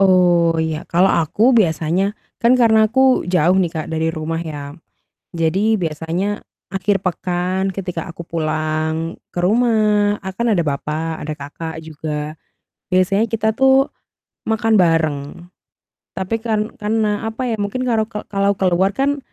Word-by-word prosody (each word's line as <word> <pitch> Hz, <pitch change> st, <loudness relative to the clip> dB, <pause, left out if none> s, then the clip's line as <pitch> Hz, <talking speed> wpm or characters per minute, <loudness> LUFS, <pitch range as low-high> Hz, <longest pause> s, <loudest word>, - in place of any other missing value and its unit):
Oh 175 Hz, -3 st, +4 dB
iya 160 Hz, -1 st, -1 dB
kalau 180 Hz, +3 st, +3 dB
aku 210 Hz, -, +3 dB
biasanya 175 Hz, +3 st, +1 dB, 0.2 s
kan 235 Hz, +2 st, +4 dB
karena 220 Hz, -2 st, +5 dB
aku 265 Hz, +2 st, +3 dB
jauh 180 Hz, 0 st, +3 dB
nih 175 Hz, -3 st, 0 dB
Kak 160 Hz, -2 st, -4 dB
dari 160 Hz, 0 st, 0 dB
rumah 165 Hz, 0 st, -3 dB
ya, 145 Hz, -3 st, -6 dB, 0.6 s
jadi 190 Hz, +7 st, +2 dB
biasanya 165 Hz, +6 st, -2 dB, 0.3 s
akhir 195 Hz, 0 st, 0 dB
pekan 185 Hz, +1 st, -1 dB
ketika 180 Hz, -3 st, -4 dB
aku 170 Hz, -, -8 dB
pulang 160 Hz, 0 st, -2 dB, 0.2 s
ke 175 Hz, -, -3 dB
rumah 210 Hz, -1 st, +3 dB
a 190 Hz, -, -4 dB
kan 235 Hz, +3 st, -1 dB
ada 170 Hz, -, +2 dB
bapak, 155 Hz, +2 st, -3 dB
ada 150 Hz, +1 st, -4 dB
kakak 160 Hz, +3 st, -7 dB
juga, 155 Hz, 0 st, -5 dB, 0.6 s
biasanya 195 Hz, +4 st, +3 dB
kita 220 Hz, 0 st, +1 dB
tuh 265 Hz, 0 st, +4 dB, 0.6 s
makan 225 Hz, 0 st, +2 dB
bareng 165 Hz, -4 st, +2 dB, 1.0 s
tapi 190 Hz, +4 st, -2 dB
kan 220 Hz, -1 st, -1 dB
karena 215 Hz, 0 st, 0 dB
apa 225 Hz, +3 st, -4 dB
ya 225 Hz, -, 0 dB
mungkin 205 Hz, +5 st, -2 dB
kalau 225 Hz, -4 st, +1 dB
ke 210 Hz, -2 st, -6 dB
kalau 200 Hz, 0 st, +1 dB
keluar 190 Hz, +1 st, +2 dB
kan 280 Hz, +3 st, 0 dB
185 Hz, 145 wpm, -19 LUFS, 160-215 Hz, 1.0 s, karena